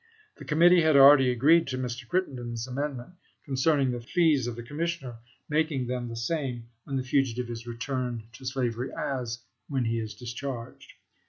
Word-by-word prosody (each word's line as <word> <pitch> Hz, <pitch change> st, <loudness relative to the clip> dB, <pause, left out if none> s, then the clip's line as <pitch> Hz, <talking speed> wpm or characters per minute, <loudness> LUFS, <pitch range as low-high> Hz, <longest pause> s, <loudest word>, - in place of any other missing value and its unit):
The -, -, -10 dB
Committee 170 Hz, +3 st, +5 dB
had 155 Hz, -2 st, +3 dB
already 135 Hz, -1 st, +8 dB
agreed 150 Hz, +7 st, +4 dB
to 130 Hz, -2 st, -3 dB
Mr. 125 Hz, -1 st, -4 dB
Crittenden's 120 Hz, -10 st, -2 dB
amendment 135 Hz, +3 st, -4 dB, 0.3 s
concerning 135 Hz, -1 st, +2 dB
the 120 Hz, -1 st, -4 dB
fees 150 Hz, -1 st, +2 dB
of 120 Hz, -, -4 dB
the 120 Hz, -, -7 dB
commissioner, 145 Hz, -3 st, -4 dB, 0.3 s
making 150 Hz, -4 st, 0 dB
them. 125 Hz, 0 st, -3 dB
the 115 Hz, -, -6 dB
same 120 Hz, -2 st, -3 dB, 0.2 s
when 140 Hz, -, -4 dB
the 130 Hz, -, 0 dB
fugitive 125 Hz, -2 st, 0 dB
is 120 Hz, 0 st, -7 dB
returned 120 Hz, 0 st, -3 dB
to 115 Hz, -, -13 dB
slavery 125 Hz, -1 st, -2 dB
as 120 Hz, -3 st, -3 dB, 0.3 s
when 130 Hz, -3 st, 0 dB
he 115 Hz, 0 st, 0 dB
is 110 Hz, -2 st, -5 dB
discharged. 120 Hz, +1 st, -7 dB
130 Hz, 165 wpm, -27 LUFS, 120-145 Hz, 0.3 s, already